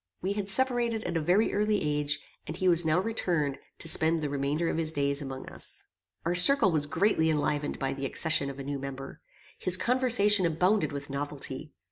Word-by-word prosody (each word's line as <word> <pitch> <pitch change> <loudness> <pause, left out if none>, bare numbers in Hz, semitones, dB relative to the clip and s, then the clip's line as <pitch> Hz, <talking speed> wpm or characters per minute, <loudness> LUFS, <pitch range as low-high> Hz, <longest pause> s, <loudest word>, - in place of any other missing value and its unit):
We 195 +2 -1
had 200 -1 -4
separated 240 -1 +1
at - - -4
a 165 - 0
very 185 +8 +1
early 210 0 0
age, 150 0 -1 0.3
and 155 +3 -5
he 185 - -1
was 175 -1 +7
now 160 +2 +1
returned 175 -9 -2 0.2
to - - -6
spend 160 +1 +3
the 145 - -3
remainder 145 +4 -2
of 165 - -2
his 160 -1 -2
days 140 -1 -1
among 135 -1 -7
us. - - -6 0.4
Our 170 - 0
circle 190 +3 +6
was 150 -2 0
greatly 160 -1 +1
enlivened 150 -1 -1
by 135 -1 -2
the 135 0 -4
accession 145 -1 0
of 140 - -9
a 140 - -7
new 140 0 -5
member. 135 0 -8 0.4
His 185 0 +3
conversation 230 -5 +3
abounded 180 +6 0
with 140 -1 -7
novelty. 145 0 -6
160 Hz, 195 wpm, -28 LUFS, 145-195 Hz, 0.4 s, was